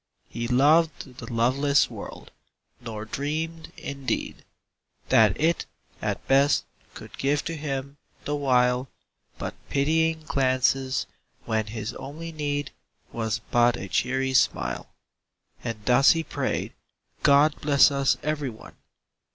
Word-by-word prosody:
He 120 0 -4
loved 140 0 +2
the - - -8
loveless 135 +5 +3
world, - - -9 0.5
nor 110 -3 -6
dreamed, 160 +6 -4
in 140 -1 -7
deed. - - -2 0.7
That 110 -3 +4
it, 165 +3 +1 0.3
at - - -3
best, 140 +2 +4 0.3
could - - -10
give 140 +1 +1
to 165 - -3
him, 140 -2 -4 0.3
the 145 - -1
while. 125 -2 +2 0.5
But - - -4 0.2
pitying 160 +3 +1
glances, 130 -1 +1 0.4
when 110 -1 -1
his 110 0 -5
only 160 +4 -7
need 145 -2 -3 0.4
Was 115 0 -2
but 120 0 +4
a 95 - -6
cheery 130 +5 0
smile. 130 - +1 0.7
And 110 -3 -5
thus 125 +5 +6
he 165 -1 -2
prayed, - - -3 0.3
" - - -51
God 145 +2 +4
bless 145 -1 +5
us 140 -1 +2
every 150 -2 -1
one!" 110 -2 -12
135 Hz, 125 wpm, -26 LUFS, 125-150 Hz, 0.7 s, thus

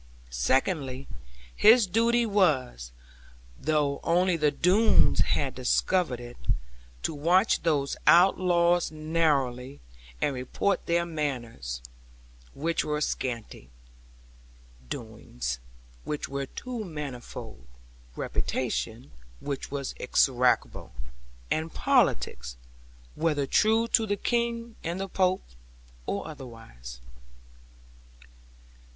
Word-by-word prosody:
Second, 130 - 0 0.5
his 225 +1 +7
duty 230 +5 +2
was 135 - +1 0.7
(though 150 -1 0
only 180 +1 +3
the 150 -2 +3
Doones 195 +9 +4
had 135 -2 +1
discovered 130 +2 +1
it) 120 0 -10 0.7
to - - -1
watch 175 +8 +3
those 145 -4 0
outlaws 175 -1 +5
narrowly, 145 -5 0 0.4
and 145 - +1
report 135 +9 -1
of - - -26
their 170 0 +2
manners 120 - -4 0.7
(which 165 +3 0
were 150 0 -1
scanty), 115 - -4 1.2
doings - - -5 0.4
(which 150 - -3
were 140 0 -4
too 245 - -6
manifold), 130 - -8 0.5
reputation 120 -1 -3 0.3
(which 140 - -4
was 140 -1 -4
execrable), 125 0 +1 0.6
and 160 +1 -1
politics, - - +1 0.6
whether 150 -4 0
true 220 +9 +3
to 225 -2 +3
the 205 0 0
King 235 +1 -1
and 170 +3 -3
the 195 - -3
Pope, 185 0 +1 0.6
or 100 - -2
otherwise. 115 - -10
150 Hz, 95 wpm, -27 LUFS, 125-180 Hz, 1.2 s, his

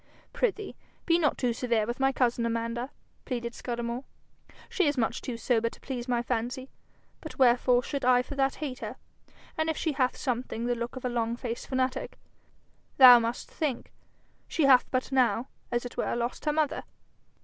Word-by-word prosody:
'Prithee, 420 -4 -1 0.3
be 335 0 +3
not 300 -4 +1
too 245 -2 0
severe 230 -3 0
with 240 +3 -4
my 270 0 +3
cousin, 245 -3 +1
Amanda,' 230 +2 -2 0.3
pleaded 240 -2 -4
Scudamore. 240 +1 -4 0.6
'She 375 -5 +1
is 290 -1 0
much 225 -3 0
too 245 -3 -5
sober 230 -1 +1
to - - -16
please 250 -2 -5
my 240 -1 0
fancy, 250 +2 -3 0.5
but 315 - -9
wherefore 245 -1 +4
should 280 +1 -4
I 250 0 +4
for 270 - -8
that 270 -1 +1
hate 270 -5 -5
her? 220 +2 -6 0.6
And 315 0 +1
if 320 - -1
she 320 - 0
hath 260 -3 0
something 245 -3 -3
the 245 - +1
look 235 +1 -4
of 260 - -6
a - - +2
long 235 -1 -1
faced 235 -1 -5
fanatic, 260 0 -2 0.8
thou 250 -2 +10
must 230 +1 -3
think, 285 -6 -3 0.6
she 320 - 0
hath 260 -2 +6
but 255 +1 -1
now, 250 -2 +2 0.2
as 240 0 -1
it 245 - -8
were, - - -1
lost 240 +5 -3
her 300 - +2
mother.' 310 0 0
250 Hz, 180 wpm, -28 LUFS, 235-270 Hz, 0.8 s, thou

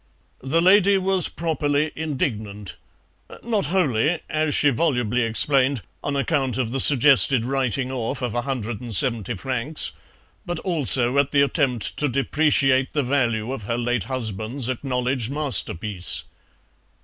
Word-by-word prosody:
The 160 +6 +1
lady 200 +1 +5
was 190 -1 +1
properly 155 -2 -1
indignant, 110 - -3 0.7
not 220 -4 -1
wholly, 160 -4 +1
as 155 -1 0
she 145 - +3
volubly 125 -4 0
explained, 130 +2 +2 0.2
on 145 - -2
account 135 -3 0
of 125 -3 -1
the 135 - -2
suggested 135 -3 +5
writing 130 0 -1
off 125 0 -3
of 120 - -2
170 120 -3 -2
francs, 130 - -2 0.5
but 175 -4 -4
also 140 -7 +2
at 140 -1 +2
the 140 -1 +3
attempt 135 - 0
to 150 - 0
depreciate 135 0 +1
the 145 - +1
value 120 -3 0
of 110 -7 -7
her 115 +3 -2
late 120 -2 -1
husband's 120 0 -4
acknowledged 125 -2 -2
masterpiece. 105 - -2
130 Hz, 125 wpm, -23 LUFS, 120-150 Hz, 0.7 s, lady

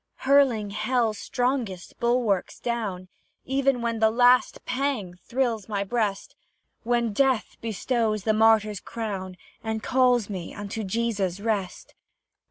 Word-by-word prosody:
Hurling 260 -7 +4
hell's 220 0 0
strongest 245 -7 -2
bulwarks 235 -5 0
down, 210 -7 -3 0.4
Even 270 -2 +1
when 230 -1 -1
the 220 0 +5
last 245 +2 +3
pang 250 -8 -2
thrills 235 -5 -1
my 200 -2 -1
breast, 205 -2 -2 0.5
When 235 -2 0
death 260 -1 +1
bestows 225 -1 -1
the 215 - +2
martyr's 215 -2 +3
crown, 195 -6 -5 0.3
And 220 -1 -3
calls 250 -4 +3
me 185 -5 -6
into 205 +2 -5
Jesus' 200 -3 -1
rest. 205 -4 -3
225 Hz, 120 wpm, -26 LUFS, 205-245 Hz, 0.5 s, the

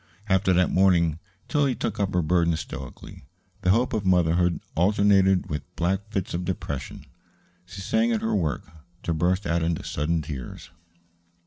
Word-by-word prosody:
After 95 -1 +2
that 90 0 +3
morning 85 -4 +3 0.3
Tillie 140 -4 +1
took - - -3
up 100 -2 -1
her 90 - +2
burden 85 0 +2
stoically. 65 -4 -8 0.4
The 90 - +1
hope 115 +6 +3
of 110 -2 -1
motherhood 90 -2 +2
alternated 95 +1 +3
with 75 - -3
black 95 +4 -1
fits 95 -4 -3
of 85 +1 -2
depression. 70 -7 -5 0.6
She 95 +1 -9
sang 230 - +1
at 225 -2 0
her 225 - -1
work, 75 -9 -1 0.4
to 85 - -1
burst 90 +5 0
out 85 0 +1
into 80 0 -1
sudden 80 +2 -1
tears. 70 +1 -8
90 Hz, 155 wpm, -25 LUFS, 85-100 Hz, 0.6 s, that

